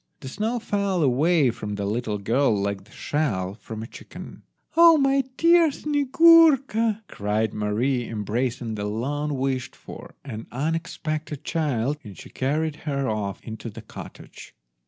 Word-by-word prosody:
The 130 - -7
snow 220 - -2
fell 200 -6 0
away 145 +1 +3
from 105 -3 -5
the 100 0 -3
little 110 0 -2
girl 115 +3 +1
like 100 -1 -3
the 105 - -22
shell 100 -14 -2
from 110 0 -8
a - - -5
chicken. - - -11 0.3
"Ah, 335 0 +8
my 275 -2 +3
dear 335 -1 +5
Snyegurka!" 280 -6 +4
cried 105 +1 -1
Mary, 115 +4 0
embracing 115 +2 -2
the 105 -1 -4
long 140 +7 -2
wished 130 -1 -2
for - - -11
and 115 -4 -7
unexpected 155 0 -3
child, 145 -3 -1
and 100 -4 -11
she - - -12
carried 150 +3 -1
her 140 -4 -2
off 105 -3 -3
into 110 +1 -7
the 105 - -10
cottage. - - -11
135 Hz, 145 wpm, -24 LUFS, 110-180 Hz, 0.3 s, Ah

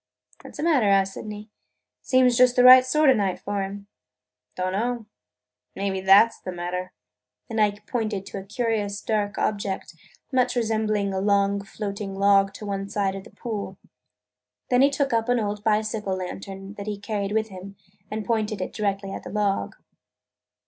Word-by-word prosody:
"What - - -12
's - - -9
the - - -3
matter?" 290 -10 +3
asked 195 -1 +3
Sydney. 210 0 -8 0.5
"Seems 255 -2 +3
just 250 0 +5
the 250 - +5
right 255 0 +10
sort 300 +2 +4
of 255 - +3
night 195 -3 0
for 205 0 -3
'em." 200 +1 -6 0.7
"Don't 185 0 -1
know. 230 +3 -2 0.7
Maybe 195 -1 -2
that 195 +4 +6
's - - -17
the 185 - -6
matter!" 180 +1 -4 0.6
And 220 -1 0
Ike 205 -1 0
pointed 215 -5 -2
to 200 - -6
a - - -8
curious 210 -1 -2
dark 210 -1 -1
object, 200 -3 -2 0.4
much 255 -1 +2
resembling 215 -3 0
a 190 - -1
long, 200 0 +2
floating 200 -1 -5
log 195 0 +4
to 210 - -8
one 195 -1 -3
side 200 -2 0
of 195 0 -8
the - - -13
pool. 205 -5 -6 0.9
Then 250 0 +5
he 275 - +6
took 280 -1 -1
up 230 +1 +1
an 245 -1 +3
old 210 -1 -3
bicycle 215 -2 0
lantern 195 +1 -7
that 200 - -6
he 210 -1 -3
carried 200 -1 -3
with 220 0 0
him 190 +1 -10 0.3
and 215 -1 -4
pointed 215 -3 -1
it 185 - -4
directly 200 -2 -2
at - - -6
the - - -9
log. 205 -2 -1
205 Hz, 180 wpm, -24 LUFS, 195-225 Hz, 0.9 s, right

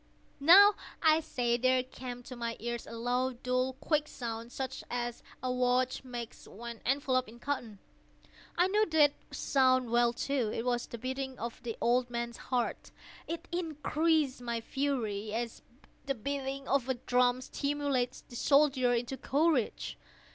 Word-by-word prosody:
—now, 385 +8 +9 0.3
I 315 0 +6
say, 240 -6 0
there 255 +1 +3
came 250 -1 -8
to 255 - -8
my 235 -1 -3
ears 235 +1 -4
a - - -8
low, 250 +2 0
dull, 255 +1 -1
quick 295 +2 0
sound, 230 -2 -6
such 265 0 -4
as 240 -1 -3 0.2
a 255 - 0
watch 250 +1 +1
makes 240 -3 -7
when 235 +2 -8
enveloped 260 -2 +1
in 230 - -13
cotton. 240 -5 -4 0.8
I 350 - +5
knew 425 +3 +2
that 305 -3 +5 0.2
sound 255 -3 +2
well, 240 0 +4
too. 245 -2 -1
It 230 - -3
was 245 -1 0
the 235 - -7
beating 260 +2 -4
of 235 +1 -6
the 230 -2 -5
old 245 +1 +2
man's 235 0 -3
heart. 250 -2 -1 0.4
It 335 +1 -5
increased 315 -4 0
my 235 -1 -2
fury, 225 -5 -2
as 235 0 -3 0.5
the 275 - 0
beating 275 +2 -4
of 265 -2 +1
a 260 - +2
drum 245 +1 +2
stimulates 280 -2 -1
the 240 - -14
soldier 270 -2 +4
into 240 +3 -2
courage. 285 -4 0
255 Hz, 155 wpm, -31 LUFS, 240-280 Hz, 0.8 s, now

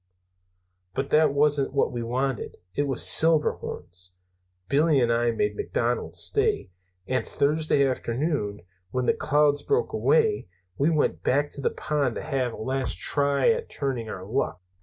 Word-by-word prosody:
"But 135 +1 -3
that 155 -1 +4
wasn't 140 -1 +1
what 140 - +2
we 120 - -4
wanted. 125 +1 -2 0.2
It 145 +8 -1
was 135 -2 -2
Silverhorns. 90 - +1 0.5
Billy 145 +2 +3
and 120 -2 +2
I 120 0 +1
made 105 -2 -1
McDonald - - -2
stay, 90 - +1 0.3
and 130 +3 -1
Thursday 150 -1 +1
afternoon, 125 - -2 0.3
when 125 +2 -2
the - - +3
clouds 145 0 +2
broke 445 +2 0
away, 445 -3 +2 0.3
we 140 +8 +2
went 155 -3 0
back 145 +2 +1
to 140 - -8
the - - +1
pond 145 -5 -2
to - - -5
have 135 -5 -2
a - - -8
last 130 -3 -1
try 140 - +2
at 460 0 -3
turning 130 -6 -3
our 95 -3 -7
luck. 115 -3 -2
140 Hz, 155 wpm, -25 LUFS, 120-150 Hz, 0.5 s, that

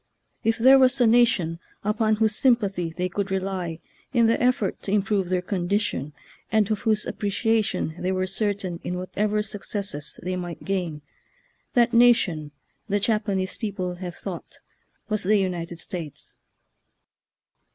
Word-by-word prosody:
If 225 0 +2
there 265 +4 +7
was 260 +1 +4
a 245 - +5
nation 220 -8 +3 0.2
upon 215 +1 +2
whose 215 0 +2
sympathy 200 - +2
they 180 +2 -2
could 200 +2 -3
rely 190 -3 -2 0.3
in 240 -3 +4
the 225 +1 +2
effort 255 +3 +1
to 195 - -4
improve 200 -2 +1
their 180 -1 0
condition, 180 -6 -1 0.4
and 215 -2 +3
of 215 - 0
whose 215 -1 +1
ap - - -6
preciation 210 -5 0
they 185 - 0
were 185 0 0
certain 195 -2 -2
in 180 - -3
whatever 210 +3 -1
successes 200 -7 -4
they 185 +1 -2
might 175 -2 -6
gain, 175 -6 -2 0.7
that 240 -1 +4
nation, 230 -11 +4 0.4
the 205 +1 +2
Japanese 205 -3 0
people 185 -5 -3
have 175 -1 -6
thought, - - -7 0.5
was 215 -1 0
the 210 +3 +3
United 175 -3 -2
States. 165 -4 -5
200 Hz, 145 wpm, -25 LUFS, 180-220 Hz, 0.7 s, there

